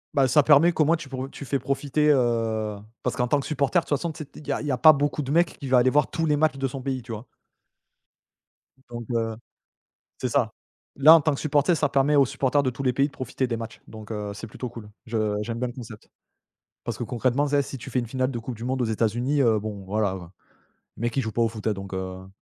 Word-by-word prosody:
Bah, 135 -2 +4
ça 140 +4 +5
permet 150 +4 +6
qu'au 160 -2 +2
moins 165 +3 +4
tu 165 -3 -8
pour 130 0 -5
tu 140 - -9
fais 140 +1 -1
profiter, 145 +2 0
heu, 115 -5 +1 0.3
parce - - -1
qu'en 125 -1 0
tant 145 +4 +2
que 135 - -5
supporter 145 +2 0
de - - -5
toute - - -16
façon, 165 +4 -3
tu 155 0 -7
sais 140 - -16
il 150 - -12
y - - -1
a - - 0
il - - -6
y 145 - 0
a 130 - 0
pas 155 +5 +9
beaucoup 145 0 0
de 135 - -5
mecs 170 +2 +2
qui 140 - -6
va 130 -1 +4
aller 125 +1 +4
voir 150 +1 +3
tous 165 - -1
les 150 -2 +2
matchs 155 -1 +1
de 135 0 0
son 135 +1 -6
pays, 130 -1 -3
tu 115 - -9
vois? 110 +2 -7 1.6
Donc, 120 -1 -6
heu, 115 -1 -1 0.8
c'est 125 - -2
ça. 120 -3 +1 0.4
Là 150 +4 +8
en 165 - +5
tant 155 +1 +1
que 140 - -4
supporter 150 +3 +2
ça 145 -2 +1
permet 140 +2 +2
aux 140 -1 +6
supporters 135 +3 +1
de 135 - 0
tous 130 +2 -6
les 125 -1 +2
pays 140 +3 +2
de - - -14
profiter 130 -1 -3
des 115 -2 -2
matchs 115 0 -8
donc, 110 0 -10
heu, 105 -1 -4
c'est 110 - -7
plutôt 125 +3 -6
cool. 115 -3 -10 0.2
Je 110 -2 0
j'aime 115 +2 -4
bien 125 - -1
le 120 - -7
concept. 115 -4 -10 0.8
Parce - - -4
concrètement 130 +4 0
tu 145 - -3
sais, 145 -1 +4
si 135 0 -6
tu 120 - -9
fais 130 - +1
une 120 - -4
finale 130 +2 -1
de 120 - -4
Coupe 120 +1 -6
du 115 - -9
monde 130 +1 -1
aux - - +2
États-Unis, 120 +6 0
heu, 115 -4 +3
bon, 105 -2 -6
voilà, 100 0 0
heu, 95 - -7 0.8
mecs 120 +1 -2
ils 135 - +2
jouent 110 - -3
pas 115 +2 +1
au - - +3
foot, 110 -1 -6
hein, 110 - +2
donc 95 -1 -8
heu 95 0 -6
130 Hz, 270 wpm, -25 LUFS, 115-140 Hz, 1.6 s, pas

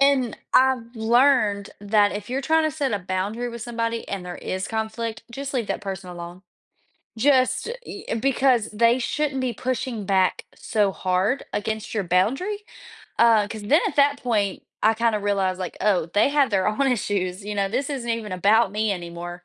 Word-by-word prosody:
and 275 -4 +3 0.2
I've 255 -2 +3
learned 225 -3 +3
that 205 0 +3
if 205 +2 -6
you're 265 +2 -1
trying 320 +3 +2
to - - -3
set 280 -5 0
a 205 - 0
boundary 195 +6 -3
with 235 -1 -7
somebody 230 -1 -3
and 195 -2 -4
there 180 0 -6
is 185 +1 -4
conflict, 220 0 -3
just 275 +3 -5
leave 235 -5 0
that - - -3
person 195 -2 -6
alone. 175 +1 -9 0.7
Just 260 - +2 0.2
y - - -8 0.2
because 260 -3 +2
they 230 +3 +3
shouldn't 275 +1 -1
be 255 -2 -1
pushing 255 -1 -3
back 190 -1 +2
so 205 -4 0
hard 185 +8 0
against 215 +1 -3
your 210 -3 0
boundary, 270 - 0 0.5
uh, 225 -3 +5
'cause 215 0 -7
then 285 +11 +4
at 290 - -8
that 280 0 +3
point, 210 -6 0 0.2
I 220 +1 +4
kind 230 0 +1
of 210 - -2
realized 195 -2 0
like, 185 - -5
"Oh, 185 -6 +2
they 205 +8 +2
have 280 -4 +3
their 195 -2 +2
own 270 +6 +1
issues, 195 -5 -1
you 210 0 -4
know, 200 -1 0
this 265 +8 -2
isn't 260 -4 -4
even 225 -3 -3
about 205 +4 +3
me 215 0 0
anymore." 175 0 -7
220 Hz, 185 wpm, -24 LUFS, 200-255 Hz, 0.7 s, uh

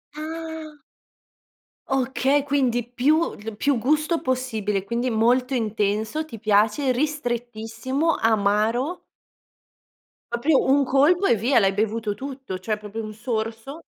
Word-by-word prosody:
Ah. 320 -1 -7 1.1
Okay, 270 +1 +1
quindi 265 -4 +1
più 290 +7 +2
il 215 +1 -8
più 280 +1 +1
gusto 305 +7 +1
possibile, 220 -6 -1
quindi 235 +5 -1
molto 250 +3 +2
intenso, 215 +4 -1
ti 310 -7 -10
piace 215 +5 +2
ristrettissimo, 245 +1 -1
amaro 225 - +1 1.3
Proprio 265 +5 +2
un 275 +1 +3
colpo 305 +9 +3
e 235 - +4
via, 240 +5 +2
l'hai 195 -3 +4
bevuto 215 +1 -1
tutto. 265 -6 -7
Cioè, 215 +3 -2
proprio 210 +1 -6
un 215 0 -7
sorso. 225 +5 -4
245 Hz, 115 wpm, -23 LUFS, 220-285 Hz, 1.3 s, e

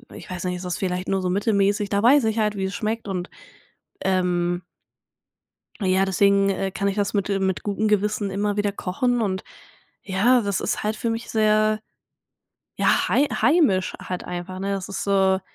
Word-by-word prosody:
ich - - -11
weiß 185 -1 -5
nicht, 180 0 -2
es 180 - -8
ist 180 - -2
vielleicht 180 -1 -2
nur 195 -1 +1
so 180 - -1
mittelmäßig. 200 +1 +1
Da 200 0 0
weiß 265 +1 +6
ich 220 0 0
halt, 210 -1 +1
wie 190 - -1
es 190 +1 -4
schmeckt 225 0 -3
und 180 -2 -3 0.7
ähm 175 -2 +1 1.2
ja, 190 0 +2
deswegen, 195 +1 +3
äh, 195 0 -1
kann 200 +1 -2
ich 195 - -1
das 205 -1 -1
mit, 200 -1 0
äh 200 -1 +1
mit 190 -2 -1
gutem 210 +1 -1
Gewissen 210 0 +1
immer 205 +1 -1
wieder 205 0 +1
kochen 235 +6 -1
und 190 -3 -1 0.6
ja, 230 +6 +3
das 200 -3 -1
ist - - -2
halt 215 +1 -1
für 230 - -2
mich 230 +1 -4
sehr, 215 0 +2 1.0
ja, - - +2
hei 285 - +3
heimisch 285 - +2
halt 180 -1 -5
einfach, 180 +1 -6
ne? 200 +1 -2
Das 195 -2 -4
ist 195 - -4
so 190 -1 +3
200 Hz, 190 wpm, -23 LUFS, 190-215 Hz, 1.2 s, weiß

